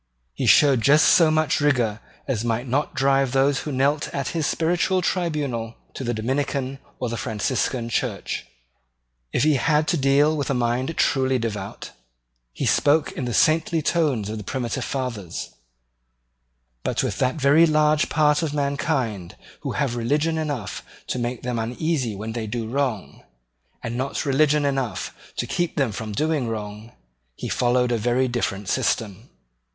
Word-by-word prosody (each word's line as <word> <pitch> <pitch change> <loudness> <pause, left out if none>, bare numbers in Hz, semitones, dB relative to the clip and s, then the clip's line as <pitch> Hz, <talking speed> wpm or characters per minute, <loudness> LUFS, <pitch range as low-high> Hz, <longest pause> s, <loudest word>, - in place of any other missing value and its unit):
He - - -2
showed 140 -5 +6
just 150 +5 +5
so 165 -3 +6
much 155 -1 +2
rigour 120 -7 +1 0.3
as 120 -5 -1
might 120 +2 -1
not 140 +4 -1
drive 135 -1 +2
those 135 +1 +3
who 150 - -5
knelt 140 +3 +1
at 140 -2 -2
his 160 -3 -1
spiritual 175 +3 +1
tribunal 145 -12 -2 0.2
to - - -6
the 120 - -1
Dominican 135 +3 -2 0.2
or 125 - -2
the 115 0 -3
Franciscan 115 +2 -1
church. 115 - -3 0.8
If - - +1
he 150 -2 +4
had 155 +3 +2
to 175 - +2
deal 140 +2 +3
with 145 -2 -2
a 135 - +1
mind 125 +5 -1
truly 130 -2 +2
devout, 115 -4 -5 0.6
he - - -4
spoke 150 +1 +3
in 130 - -4
the 120 - -3
saintly 160 0 +2
tones 145 - +1
of 110 +1 -4
the - - -7
primitive 125 +2 -3
fathers, 115 -10 -4 1.3
but - - -1
with - - -2
that 130 0 +1
very 150 +3 +5
large 155 0 +3
part 150 0 +3
of 150 -3 -2
mankind 140 - -1 0.2
who - - -4
have 135 -5 -1
religion 150 +7 0
enough 145 -9 -3 0.3
to 125 - -1
make 120 0 -3
them 120 -1 -2
uneasy 125 0 -1
when 110 +3 -5
they 110 -1 -4
do 115 +1 -3
wrong, 130 -4 -2 0.6
and 115 +1 -4
not 135 +4 -2
religion 145 +1 +3
enough 135 -7 -2 0.2
to - - -1
keep 175 -1 -2
them 135 -6 +1
from 110 +1 -5
doing 150 +3 0
wrong, 105 0 -6 0.4
he - - -6
followed 125 0 +1
a 120 - +1
very 120 +4 +1
different 105 -5 -2
system. 115 -1 -1
130 Hz, 160 wpm, -23 LUFS, 115-150 Hz, 1.3 s, showed